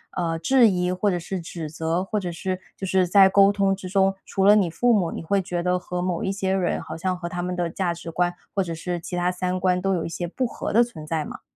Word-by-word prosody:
呃， 165 Hz, -2 st, -1 dB
质 240 Hz, +6 st, +5 dB
疑 180 Hz, -2 st, 0 dB
或 195 Hz, +3 st, +1 dB
者 175 Hz, -, -1 dB
是 180 Hz, +2 st, -5 dB
指 165 Hz, -2 st, -6 dB
责， 160 Hz, +2 st, -1 dB
或 210 Hz, +3 st, -3 dB
者 180 Hz, -3 st, -4 dB
是 185 Hz, +2 st, -4 dB, 0.2 s
就 195 Hz, -, -4 dB
是 185 Hz, 0 st, +3 dB
在 195 Hz, +2 st, +7 dB
沟 195 Hz, +1 st, +5 dB
通 195 Hz, -1 st, +1 dB
之 185 Hz, -1 st, -8 dB
中， 195 Hz, 0 st, +2 dB
除 195 Hz, -, 0 dB
了 205 Hz, +1 st, +8 dB
你 195 Hz, -5 st, +3 dB
父 240 Hz, +8 st, +2 dB
母， 185 Hz, -6 st, +1 dB
你 -, -, -5 dB
会 195 Hz, +4 st, +1 dB
觉 175 Hz, -2 st, -3 dB
得 180 Hz, +1 st, +1 dB
和 180 Hz, 0 st, -4 dB
某 180 Hz, -2 st, -2 dB
一 190 Hz, -, 0 dB
些 195 Hz, -1 st, -1 dB
人， 185 Hz, -2 st, 0 dB
好 160 Hz, -, -7 dB
像 185 Hz, +2 st, -2 dB
和 175 Hz, -1 st, -5 dB
他 175 Hz, 0 st, -4 dB
们 180 Hz, +1 st, -3 dB
的 175 Hz, -1 st, -1 dB
价 175 Hz, 0 st, -1 dB
值 170 Hz, 0 st, -8 dB
观 175 Hz, +1 st, 0 dB, 0.2 s
或 195 Hz, -, +2 dB
者 170 Hz, -2 st, -5 dB
是 175 Hz, +2 st, -3 dB
其 180 Hz, -, -6 dB
它 175 Hz, 0 st, +1 dB
三 180 Hz, 0 st, -2 dB
观， 180 Hz, 0 st, +1 dB
都 195 Hz, +1 st, +1 dB
有 170 Hz, -3 st, -1 dB
一 -, -, -4 dB
些 175 Hz, +1 st, -4 dB
不 255 Hz, +9 st, -2 dB
合 -, -, -5 dB
的 235 Hz, +3 st, +5 dB
存 160 Hz, -10 st, -10 dB
在 155 Hz, -1 st, -2 dB
吗？ -, -, -9 dB
180 Hz, 300 characters per minute, -24 LUFS, 175-195 Hz, 0.2 s, 了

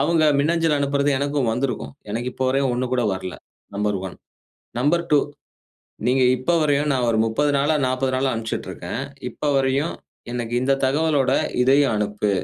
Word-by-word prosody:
அவங்க 165 Hz, -1 st, +2 dB, 0.2 s
மின்னஞ்சல் 165 Hz, +1 st, +2 dB
அனுப்புறது 140 Hz, 0 st, +1 dB
எனக்கும் 140 Hz, -3 st, 0 dB
வந்திருக்கும். 125 Hz, +4 st, -3 dB, 0.2 s
எனக்கு 120 Hz, +4 st, -2 dB
இப்போ 130 Hz, -, -2 dB
வரைக்கும் 135 Hz, -1 st, +1 dB
ஒண்ணு 125 Hz, +1 st, -1 dB
கூட 125 Hz, -, +1 dB
வரல. 95 Hz, -1 st, -6 dB, 0.4 s
நம்பர் 105 Hz, -1 st, 0 dB
1. -, -, -9 dB, 0.6 s
நம்பர் 170 Hz, +6 st, +2 dB
2 150 Hz, -, +7 dB, 0.9 s
நீங்க 130 Hz, +1 st, +3 dB
இப்போ 130 Hz, +7 st, -1 dB
வரையும் 145 Hz, -1 st, +2 dB
நான் 125 Hz, -2 st, +1 dB
ஒரு 110 Hz, -, +1 dB
30 130 Hz, +7 st, +1 dB
நாளா 145 Hz, +3 st, +2 dB
40 130 Hz, +1 st, 0 dB
நாளா 130 Hz, +1 st, +1 dB
அனுப்ச்சிட்டு 115 Hz, -1 st, -4 dB
இருக்கேன். 95 Hz, +7 st, -5 dB, 0.3 s
இப்ப 150 Hz, -, -4 dB
வரையும், 135 Hz, +4 st, +1 dB, 0.4 s
எனக்கு 120 Hz, -1 st, -3 dB
இந்த 135 Hz, -, +2 dB
தகவலோட 145 Hz, 0 st, +2 dB, 0.3 s
இதையும் 135 Hz, 0 st, +4 dB
அனுப்பு. 105 Hz, 0 st, -1 dB
130 Hz, 160 wpm, -22 LUFS, 120-145 Hz, 0.9 s, 2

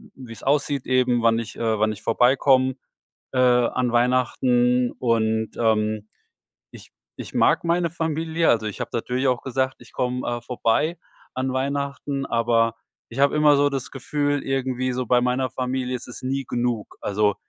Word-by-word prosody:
wie's 120 Hz, -4 st, -11 dB
aussieht 140 Hz, -1 st, 0 dB
eben, 125 Hz, -2 st, +2 dB
wann 115 Hz, 0 st, +3 dB
ich, 115 Hz, 0 st, -7 dB
äh 110 Hz, -2 st, 0 dB
wann 110 Hz, 0 st, +2 dB
ich 100 Hz, -, -13 dB
vorbeikomme, 130 Hz, +2 st, +3 dB, 0.6 s
äh, 130 Hz, -, -2 dB
an 125 Hz, 0 st, +3 dB
Weihnachten. 125 Hz, 0 st, +2 dB
Und, 110 Hz, -2 st, +1 dB
ähm, 110 Hz, -2 st, 0 dB, 0.6 s
ich -, -, -13 dB, 0.3 s
ich -, -, -9 dB
mag -, -, +3 dB
meine 170 Hz, 0 st, +1 dB
Familie. 160 Hz, 0 st, -1 dB
Also, 110 Hz, -2 st, +2 dB
ich 105 Hz, -, -6 dB
habe -, -, -4 dB
natürlich 125 Hz, +3 st, -1 dB
auch 125 Hz, -, 0 dB
gesagt: 130 Hz, 0 st, -1 dB
„Ich 120 Hz, -2 st, -16 dB
komme, 125 Hz, 0 st, -2 dB
äh, 120 Hz, 0 st, -2 dB
vorbei 125 Hz, +7 st, 0 dB, 0.4 s
an 130 Hz, 0 st, -2 dB
Weihnachten.“ 140 Hz, +1 st, -2 dB
Aber 115 Hz, -1 st, +1 dB, 0.3 s
ich 115 Hz, -, -8 dB
habe 140 Hz, +1 st, +3 dB
immer 150 Hz, -1 st, +5 dB
so 145 Hz, 0 st, +3 dB
das 135 Hz, -3 st, -4 dB
Gefühl 145 Hz, +2 st, -1 dB
irgendwie 130 Hz, -1 st, -1 dB
so 125 Hz, +1 st, -2 dB
bei 125 Hz, +1 st, +3 dB
meiner 125 Hz, +1 st, 0 dB
Familie 130 Hz, 0 st, -2 dB
ist 120 Hz, -, -10 dB
es 125 Hz, -, -8 dB
nie 135 Hz, +1 st, -2 dB
genug. 120 Hz, -3 st, -2 dB
Also, 105 Hz, 0 st, +1 dB
125 Hz, 165 wpm, -23 LUFS, 115-135 Hz, 0.6 s, immer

